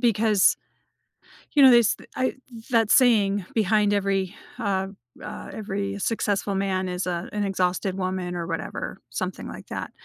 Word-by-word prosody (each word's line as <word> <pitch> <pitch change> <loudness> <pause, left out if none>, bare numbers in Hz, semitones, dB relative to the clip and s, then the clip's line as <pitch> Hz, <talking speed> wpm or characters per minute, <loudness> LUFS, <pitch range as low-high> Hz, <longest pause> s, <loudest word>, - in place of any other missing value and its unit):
because 220 -4 +4 1.0
you 285 - +5
know, 265 - +10
this 235 -3 +5 0.2
I 255 - 0 0.4
that 225 -3 +3
saying, 205 -6 +4
"Behind 210 -1 +3
every 195 -2 0 0.2
uh, 195 -4 0 0.4
uh - - -7
every 200 -1 -3
successful 205 -2 -1
man 190 -1 0
is 180 +1 -3
a 175 0 -3
an 210 0 -1
exhausted 185 0 0
woman," 185 -1 -2
or 170 -1 -3
whatever- - - -4
something - - -4
like - - -9
that. - - -5
200 Hz, 145 wpm, -25 LUFS, 190-215 Hz, 1.0 s, know